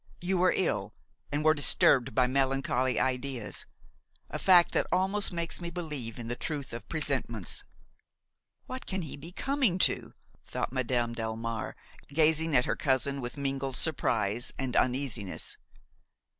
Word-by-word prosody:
You 180 +1 0
were 185 +1 +4
ill, 185 - 0 0.4
and 145 +1 -1
were 155 - +7
disturbed 135 -5 +4
by 125 - +5
melancholy 130 -1 +1
ideas; 130 -3 -2 0.6
a - - -3
fact 180 -3 +6
that - - +1
almost 195 +3 +1
makes 170 0 -4
me 170 - -4
believe 150 -10 -4
in 120 -2 -6
the 120 - -1
truth 145 -1 -4
of 115 -1 -7
presentiments." 130 - 0 1.0
"What 255 0 -7
can 190 -2 -2
he 155 - -6
be 155 +5 -10
coming 265 -3 +1
to?" - - +1 0.3
thought - - -3
Madame 120 -2 0
Delmare, 115 0 -3 0.3
gazing 160 +1 +2
at 125 - +5
her - - 0
cousin 135 0 +1
with 120 +3 -5
mingled 135 -1 -2
surprise 115 -7 0
and 130 -2 -3
uneasiness. 125 -7 -1
135 Hz, 145 wpm, -30 LUFS, 120-165 Hz, 1.0 s, were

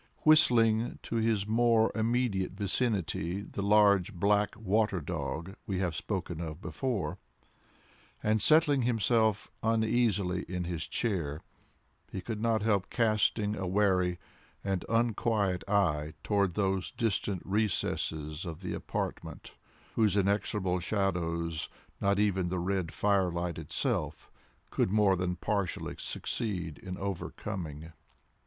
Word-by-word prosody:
Whistling 120 -7 +4
to 115 - -3
his 110 -3 +1
more 115 0 +3
immediate 110 -4 0
vicinity 100 -3 -1
the 100 - -6
large 100 -1 +4
black 100 +3 +2
water 105 -2 +1
dog 85 +3 -4
we 95 - -1
have 90 -3 0
spoken 85 0 -3
of 80 -1 -5
before, 100 - -3 1.0
and 110 0 +2
settling 150 0 +5
himself 115 -2 +1
uneasily 110 -5 +1
in 90 -1 -2
his 85 -2 -3
chair, 85 -10 -2 0.7
he 95 - -4
could 105 +3 -5
not 115 -2 +1
help 100 -4 +1
casting 110 -2 +1
a 95 -2 -3
wary 90 -2 +2 0.5
and 95 -3 -1
unquiet 110 -4 +1
eye 80 -7 +1
toward 100 -4 +1
those 95 -3 0
distant 105 -5 -1
recesses 80 -6 -1
of 85 -1 -6
the 90 - -4
apartment - - -5 0.4
whose 105 -3 +3
inexorable 100 -2 +1
shadows 85 -4 -1 0.3
not 100 0 +2
even 95 -3 +2
the 90 +1 -2
red 90 -1 -1
firelight 90 -5 0
itself 75 - -2 0.4
could - - +1
more 105 -1 +4
than 90 0 -1
partially 100 0 -2
succeed 90 -9 -2
in 90 -1 -6
overcoming. 85 -4 -5
100 Hz, 120 wpm, -30 LUFS, 90-110 Hz, 1.0 s, settling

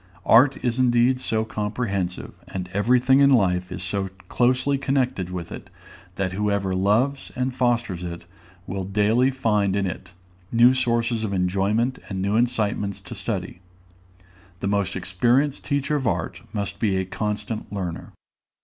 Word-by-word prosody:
Art 130 +4 +6
is 120 +1 0
indeed 125 +1 +3
so 110 -2 0
comprehensive, 105 -4 -3
and 90 -1 -6
every 115 +6 +3
thing 130 +2 +4
in 140 0 +6
life 90 -8 +2
is - - -5
so 95 +1 -2 0.2
closely 130 +3 +2
connected 130 -8 0
with 90 -2 -6
it, - - -9 0.5
that 95 -1 -1
whoever 100 -1 0
loves 110 +9 +1
and 130 +1 -1
fosters 120 -8 0
it 85 -1 -6 0.4
will 95 +1 -4
daily 105 +6 +2
find 105 -7 +1
in 100 -1 +1
it 90 0 -6 0.4
new 120 +2 +6
sources 115 -2 0
of 100 -2 -2
enjoyment 100 +7 +1
and 95 -2 -3
new 100 +2 0
incitements 110 -4 0
to - - -9
study. 90 - -4 1.0
The 100 - -2
most 100 -2 0
experienced 120 +10 +1
teacher 140 +1 0
of 130 -4 -2
art - - -2
must 100 -1 -4
be 100 -4 +1
a 95 - -1
constant 105 +3 -4
learner. 90 -5 -5
105 Hz, 150 wpm, -24 LUFS, 95-125 Hz, 1.0 s, Art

